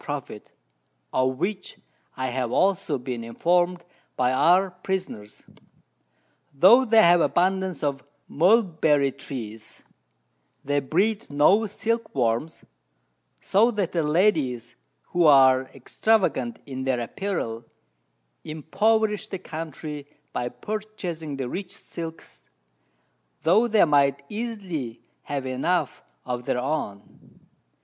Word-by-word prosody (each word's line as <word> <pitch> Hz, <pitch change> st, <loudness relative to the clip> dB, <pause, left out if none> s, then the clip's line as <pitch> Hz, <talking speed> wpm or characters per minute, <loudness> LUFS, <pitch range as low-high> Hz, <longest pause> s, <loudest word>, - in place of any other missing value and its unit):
_ -, -, -21 dB
Profit, 140 Hz, -7 st, -7 dB, 0.6 s
of 130 Hz, 0 st, +1 dB
which 190 Hz, +5 st, -4 dB, 0.4 s
I 130 Hz, 0 st, -2 dB
have 125 Hz, -1 st, -2 dB
also 185 Hz, -6 st, +1 dB
been 125 Hz, -2 st, -5 dB
informed 175 Hz, +8 st, 0 dB, 0.3 s
by 125 Hz, 0 st, +1 dB
our 180 Hz, +7 st, +4 dB
Prisoners. 185 Hz, -, -5 dB, 1.1 s
Though 220 Hz, -, +7 dB
they 225 Hz, -1 st, +5 dB
have 175 Hz, 0 st, +6 dB
abundance 185 Hz, -1 st, 0 dB
of 140 Hz, -2 st, -1 dB, 0.2 s
Mulberry 160 Hz, -6 st, +3 dB
trees, 115 Hz, -6 st, -9 dB, 0.8 s
they 145 Hz, +1 st, +1 dB
breed 200 Hz, -, 0 dB
no 190 Hz, +10 st, +4 dB
Silk 230 Hz, +3 st, -3 dB
worms; 120 Hz, +5 st, -1 dB, 0.8 s
so 215 Hz, +5 st, +3 dB
that 205 Hz, -7 st, -2 dB
the 170 Hz, -, 0 dB
Ladies, 150 Hz, -, +1 dB, 0.3 s
who 175 Hz, -1 st, +2 dB
are 130 Hz, -2 st, +6 dB
extravagant 140 Hz, -, 0 dB
in 130 Hz, -2 st, -6 dB
their 130 Hz, -2 st, 0 dB
Apparel, 120 Hz, -, -4 dB, 0.8 s
impoverish 210 Hz, +7 st, 0 dB
the 195 Hz, -, -5 dB
Country 155 Hz, -4 st, -7 dB, 0.3 s
by 120 Hz, 0 st, -2 dB
purchasing 175 Hz, -1 st, -6 dB
the 130 Hz, -2 st, -3 dB
richest 185 Hz, +7 st, -7 dB
Silks, 165 Hz, -1 st, -9 dB, 0.9 s
tho' 215 Hz, +8 st, +4 dB
they 215 Hz, -4 st, +4 dB
might 140 Hz, -2 st, +2 dB
easily 195 Hz, -, -5 dB, 0.2 s
have 140 Hz, -2 st, -4 dB
enough 140 Hz, +5 st, -1 dB, 0.2 s
of 125 Hz, -1 st, -4 dB
their -, -, 0 dB
own. 125 Hz, -7 st, -5 dB
155 Hz, 110 wpm, -25 LUFS, 130-190 Hz, 1.1 s, Though